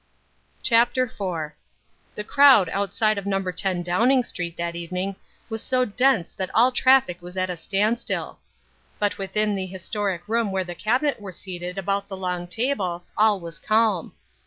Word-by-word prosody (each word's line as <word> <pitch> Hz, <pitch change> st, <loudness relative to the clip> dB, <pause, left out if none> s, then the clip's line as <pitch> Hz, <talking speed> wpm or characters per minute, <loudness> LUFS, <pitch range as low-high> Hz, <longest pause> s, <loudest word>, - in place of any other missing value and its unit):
CHAPTER 240 Hz, +2 st, +3 dB
IV 180 Hz, -10 st, -4 dB, 0.6 s
The 210 Hz, -, -4 dB
crowd 265 Hz, -7 st, +6 dB
outside 200 Hz, +2 st, 0 dB
of 200 Hz, -, -8 dB
No. 195 Hz, -1 st, +1 dB
10 185 Hz, -1 st, -1 dB
Downing 235 Hz, +9 st, +3 dB
Street 170 Hz, -7 st, -5 dB
that 170 Hz, 0 st, -3 dB
evening 180 Hz, +3 st, -4 dB, 0.3 s
was 225 Hz, -1 st, -4 dB
so 255 Hz, -1 st, +1 dB
dense 250 Hz, -4 st, +1 dB
that 190 Hz, -1 st, -4 dB
all 245 Hz, +3 st, +5 dB
traffic 255 Hz, -9 st, +3 dB
was 180 Hz, +1 st, -8 dB
at 185 Hz, 0 st, 0 dB
a -, -, -3 dB
standstill. 205 Hz, +7 st, -1 dB, 0.6 s
But 205 Hz, -1 st, -1 dB
within 210 Hz, +2 st, 0 dB
the 190 Hz, -1 st, -2 dB
historic 190 Hz, 0 st, -3 dB
room 225 Hz, -2 st, 0 dB
where 190 Hz, -1 st, 0 dB
the 175 Hz, -1 st, -7 dB
Cabinet 250 Hz, -, 0 dB
were 195 Hz, -2 st, -7 dB
seated 180 Hz, 0 st, -6 dB
about 200 Hz, +1 st, -1 dB
the 195 Hz, -2 st, -7 dB
long 180 Hz, -1 st, -3 dB
table 190 Hz, -5 st, -2 dB
all 210 Hz, -2 st, +4 dB
was 170 Hz, -1 st, -8 dB
calm. 215 Hz, -5 st, +1 dB
195 Hz, 160 wpm, -24 LUFS, 180-225 Hz, 0.6 s, crowd